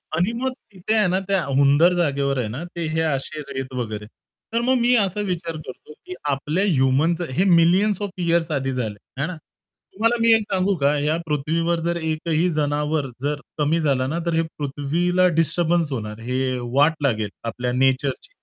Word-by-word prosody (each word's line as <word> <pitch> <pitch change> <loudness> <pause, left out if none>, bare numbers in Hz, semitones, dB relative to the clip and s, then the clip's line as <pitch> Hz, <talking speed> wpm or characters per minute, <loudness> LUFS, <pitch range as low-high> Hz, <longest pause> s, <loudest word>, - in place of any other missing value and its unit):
आणि 180 +7 +1
मग 265 - 0 0.2
तिथे 190 +3 -2
आहे 210 -3 +4
ना 185 +1 +1
त्या 195 -3 +1
हुंदर 140 +5 +4
जागेवर 140 -4 +1
आहे 115 - -1
ना, 125 +10 -5
ते 170 -1 -5
हे 160 +1 0
असे 150 0 -2
रेत 130 0 -5
वगैरे. 110 -4 -4 0.5
तर 230 - +1
मग 255 +2 +2
मी 245 +1 +4
असा 205 -1 +1
विचार 170 -2 -3
करतो, 130 +4 -10
की 180 - -7 0.2
आपल्या 150 +7 0
ह्युमनचे 155 0 +2
हे 180 - +2 0.2
मिलियन्स 190 +4 +3
ऑफ 205 - -2 0.2
इअर्स 170 -1 +1
आधी 135 -2 -1
झाले 110 -5 -3 0.2
आहे 140 +3 -1
ना. 180 - -5 0.6
तुम्हाला 230 +3 +2
मी 230 0 +5
एक 225 - +4
सांगू 190 +1 +1
का? 145 +1 +3
या 150 +2 +1
पृथ्वीवर 165 +3 0
जर 170 - 0
एकही 160 +1 0
जनावर 150 0 0 0.2
जर 145 0 -1 0.2
कमी 155 +2 +1
झाला 135 -4 +1
ना, 160 +5 -2
तर 170 - 0
हे 165 - +3 0.2
पृथ्वीला 165 +6 +1
डिस्टर्बन्स 165 -1 +1
होणार, 105 -3 -4
हे 130 +2 -1 0.2
वाट 145 +4 +4
लागेल 110 -6 0 0.2
आपल्या 125 +2 -2
नेचरची. 130 - 0
155 Hz, 180 wpm, -22 LUFS, 135-175 Hz, 0.6 s, मी